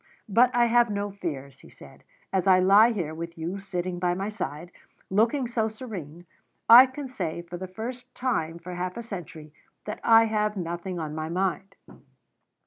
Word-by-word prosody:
"But 230 +4 +4
I 240 0 +5
have 235 0 +3
no 205 0 -3
fears," 140 -8 -6
he - - -16
said. - - -16 0.3
"As 190 0 +1
I 185 -1 +7
lie 200 +5 +6
here, 175 -8 -3
with 170 +1 -7
you 170 +5 -4
sitting 180 -2 -4
by 175 0 0
my 195 +3 -3
side, 175 -5 -6 0.4
looking 230 +7 +2
so 235 -2 -1
serene, 185 - -8 0.4
I 245 +3 +10
can 265 +2 -7
say, 170 -9 -4
for 175 +1 -8
the 185 +1 -6
first 245 +6 -8
time 170 -11 -1
for 175 +2 -9
half 180 +2 -4
a 235 - -5
century, 165 -8 -9 0.3
that 210 - -5
I 225 0 +7
have 210 -1 -1
nothing 175 +1 -4
on 155 -2 -4
my 155 0 -4
mind. 190 +2 -2
190 Hz, 180 wpm, -26 LUFS, 170-225 Hz, 0.4 s, I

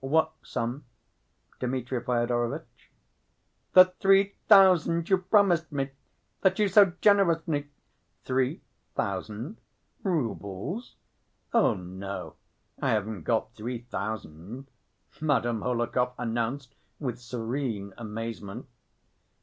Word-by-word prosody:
"What 160 +3 +2
sum, 120 +5 -4 0.7
Dmitri 125 0 -2
Fyodorovitch?" 120 -1 -2 0.8
"The 185 0 +8
three 195 +1 +4
thousand 180 -5 +6
you 190 - +5
promised 180 -4 +3
me... 140 -1 -2 0.5
that 190 -1 +3
you 210 -2 +3
so 195 -2 +6
generously—" 165 -7 +3 0.6
"Three 130 +3 0 0.3
thousand? 105 - -3 0.4
Roubles? 140 - -3 0.6
Oh, 225 - +4
no, 95 +2 -6 0.5
I - - +1
haven't 105 -5 -1
got 115 -1 0
three 120 +2 -5
thousand," 105 - -6 0.5
Madame 120 -7 +1
Hohlakov 125 +1 0
announced 120 +2 -2 0.3
with 125 -5 -3
serene 115 -4 -3
amazement. 115 0 -6
125 Hz, 95 wpm, -28 LUFS, 115-165 Hz, 0.8 s, The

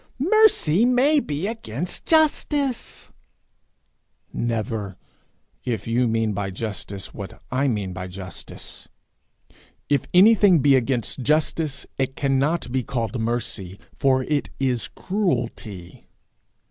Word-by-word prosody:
'Mercy 290 - +4
may 255 +5 +4
be 150 - -3
against 180 - -4
justice.' 295 -4 +1 1.2
Never 110 -4 -2 0.7
if 115 -5 -3
you 120 +2 +1
mean 110 -1 0
by 100 0 -2
justice 100 -1 -5
what 100 -3 -8
I 135 +3 +1
mean 105 -7 -1
by 90 0 -5
justice. 90 -1 -8 1.0
If 140 -3 +1
anything 200 -1 +6
be 140 -1 +4
against 125 -1 0
justice, 150 +1 0
it 135 0 -1
cannot 140 +1 0
be 130 0 +1
called 120 -2 -3
mercy, 110 -5 -3 0.2
for 130 -2 +2
it 145 +1 -1
is 130 -3 0
cruelty. 120 - -3
130 Hz, 110 wpm, -23 LUFS, 110-170 Hz, 1.2 s, anything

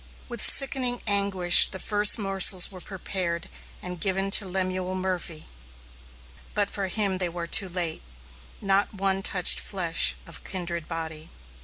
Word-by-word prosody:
With 240 -3 -7
sickening 255 -3 +3
anguish 200 -4 +4
the 190 - -7
first 205 +3 +4
morsels 195 -2 +2
were 185 -2 -13
prepared 185 -3 -6 0.4
and 180 -1 -8
given 195 0 -1
to 195 - +3
Lemuel 185 0 -4
Murphy, 180 -4 -5 1.1
but 205 -1 -1
for 195 -2 -4
him 195 -1 -2
they 180 -2 -2
were 170 0 -7
too 190 +3 +2
late. 175 -3 -4 0.6
Not 195 +1 -1
one 195 0 -2
touched 180 -2 +5
flesh 175 -4 0
of 165 - -11
kindred 170 -3 -6
body. 160 -1 -8
190 Hz, 140 wpm, -24 LUFS, 175-200 Hz, 1.1 s, touched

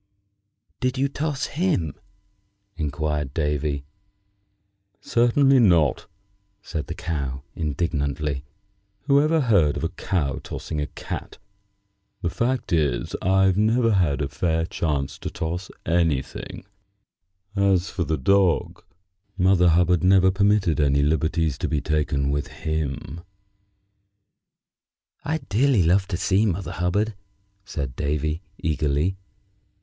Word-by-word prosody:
"Did 130 +1 -1
you 135 +1 +2
toss 145 0 -2
him?" 150 - 0 0.8
inquired 75 -2 -2
Davy. 75 -2 -1 1.1
"Certainly 130 +3 +3
not," 85 - +3 0.6
said 80 -4 -4
the - - -5
Cow, 70 -5 -4
indignantly. 75 -3 -2 0.6
"Who 140 0 +4
ever 155 +1 +2
heard 100 - +3
of - - -4
a - - 0
cow 75 -8 -2
tossing 75 -2 -5
a 75 - -2
cat? - - -7 0.9
The 85 - 0
fact 125 -1 -1
is, 75 -7 0
I've 95 0 +3
never 115 +2 +3
had 75 -7 +2
a - - -1
fair 80 +1 0
chance 75 -5 -2
to - - -4
toss 85 +3 -4 0.2
anything. 80 -3 -1 0.9
As 95 -2 +2
for 85 - -1
the 80 -1 -1
dog, 90 +2 +2 0.5
Mother 90 -2 +4
Hubbard 90 +1 +3
never 95 0 +5
permitted 100 -5 +2
any 70 -1 +3
liberties 80 +1 0
to - - -1
be 75 - 0
taken 70 -2 0
with 70 0 -1
him." 80 -1 -4 2.0
"I'd 160 +1 -3
dearly 115 0 +3
love 95 +4 +3
to 90 - -2
see 100 +4 +2
Mother 90 -2 -2
Hubbard," 95 +5 0 0.5
said 70 -9 -4
Davy, 75 +3 -1 0.2
eagerly. 75 +3 0
85 Hz, 115 wpm, -24 LUFS, 75-100 Hz, 2.0 s, never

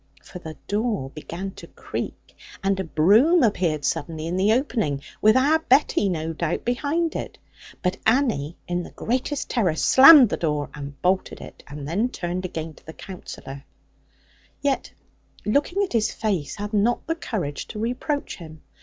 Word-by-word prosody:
For 180 - -10
the 160 -3 -9
door 205 - -1
began 175 +6 -6
to - - -12
creak, - - -7 0.3
and 195 0 +1
a - - 0
broom 215 - +4
appeared 170 - +1
suddenly 155 +1 -2
in 170 +2 -2
the 195 +3 +3
opening, 220 - -1 0.2
with 215 +3 +6
our 295 +5 +4
Betty, 265 -8 +3
no 165 -2 -2
doubt, 160 0 -2
behind 295 +7 0
it. - - -5 0.5
But 180 0 0
Annie, 220 - +1
in 175 0 -1
the - - -8
greatest 260 +4 -2
terror, 190 -10 +1
slammed 270 - +8
the - - -2
door, 150 -3 -1
and 140 -1 -8
bolted 185 +1 0
it, - - -11
and 145 -1 -7
then 205 +10 0
turned 180 -4 -4
again 160 -2 -5
to - - -21
the 160 - -8
Counsellor; 140 -8 -9 1.0
yet 280 -2 -1 0.5
looking 295 - +1
at 385 - -4
his 225 -1 +2
face, 185 -11 -2
had 205 +1 -6
not 215 +4 +1
the 325 - 0
courage 185 - -4
to - - -8
reproach 250 +6 -2
him. 160 -3 -12
195 Hz, 165 wpm, -24 LUFS, 160-245 Hz, 1.0 s, slammed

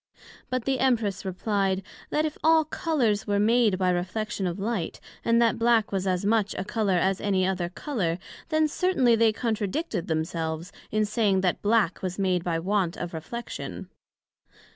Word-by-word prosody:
But 255 -2 -2
the 270 -1 0
Empress 230 -7 +1
replied, 195 0 -1 0.3
That 305 +1 +1
if 310 - -3
all 320 0 +5
Colours 245 -10 0
were 205 0 +1
made 220 -2 +3
by 185 -1 +2
reflection 190 +3 -2
of 175 - -3
light, 200 -4 -2 0.2
and 230 0 +3
that 230 -1 +2
Black 230 -2 +3
was 195 -1 -1
as 185 +1 0
much 210 -1 +2
a 185 - -2
colour 210 -3 0
as 190 +2 +1
any 190 -2 +1
other 180 -2 -1
colour; 185 - -2 0.3
then 310 -1 +3
certainly 290 -8 +2
they 225 0 +4
contradicted 220 - -2
themselves 160 +1 -2 0.2
in 215 0 +1
saying 205 -3 +2
that 180 -2 0
black 210 -4 +2
was 185 -1 -3
made 185 -3 +1
by 170 -2 0
want 185 0 0
of 175 -1 -5
reflection. 235 +10 -6
205 Hz, 165 wpm, -26 LUFS, 185-230 Hz, 0.3 s, all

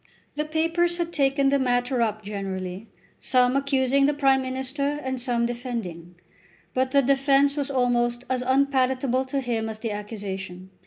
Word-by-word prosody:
The 300 +1 -2
papers 330 +2 +1
had 340 -1 -3
taken 275 -1 +2
the 280 0 +2
matter 245 0 +1
up 215 -2 -1
generally, 195 0 -5 0.3
some 250 0 +2
accusing 275 0 +2
the 295 - +1
Prime 270 -2 +3
Minister 265 +3 -2
and 260 -1 -3
some 240 -2 0
defending. 230 -9 -5 0.6
But 260 0 +1
the 280 +1 +3
defence 275 +1 +3
was 285 -2 -2
almost 245 -2 +1
as 255 -1 -1
unpalatable 260 -1 +1
to 275 +1 -2
him 230 -3 -2
as 220 - -6
the 225 0 -4
accusation. 195 -3 -6
255 Hz, 155 wpm, -25 LUFS, 230-275 Hz, 0.6 s, Prime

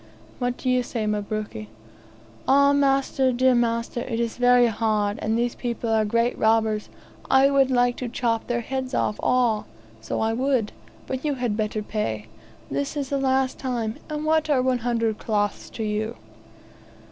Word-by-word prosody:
"What 245 -1 -1
do - - -6
you 255 0 +3
say, 235 -2 -3
Mabruki?" 210 - -3 0.8
"Ah, 280 +1 +5
master, 270 -1 +2
dear 255 +1 +3
master; 235 0 0
it 235 -2 -3
is 235 -1 -1
very 245 0 +5
hard, 215 -2 0
and 220 +1 0
these 240 0 0
people 235 -2 -3
are 220 -1 +3
great 230 +3 +1
robbers. 220 -1 +2 0.4
I 270 +1 +5
would 275 -1 +4
like 245 -1 +2
to 250 - -4
chop 230 -2 -1
their 240 -1 0
heads 260 +2 -3
off, 210 - 0
all; 240 -4 +1 0.3
so 110 - -3
I 220 0 +1
would. 250 -3 0 0.3
But 260 0 -4
you 295 -2 0
had 245 -5 -1
better 215 0 -2
pay. 110 - -3 0.5
This 140 - -2
is 275 -2 -2
the 280 - 0
last 265 -1 +1
time; 235 -4 -2
and 305 0 -3
what 315 0 +2
are 265 -4 +3
one 255 -1 +1
hundred 230 -2 -1
cloths 205 -2 -1
to 225 - -5
you?" 215 +2 -2
240 Hz, 170 wpm, -24 LUFS, 220-260 Hz, 0.8 s, Ah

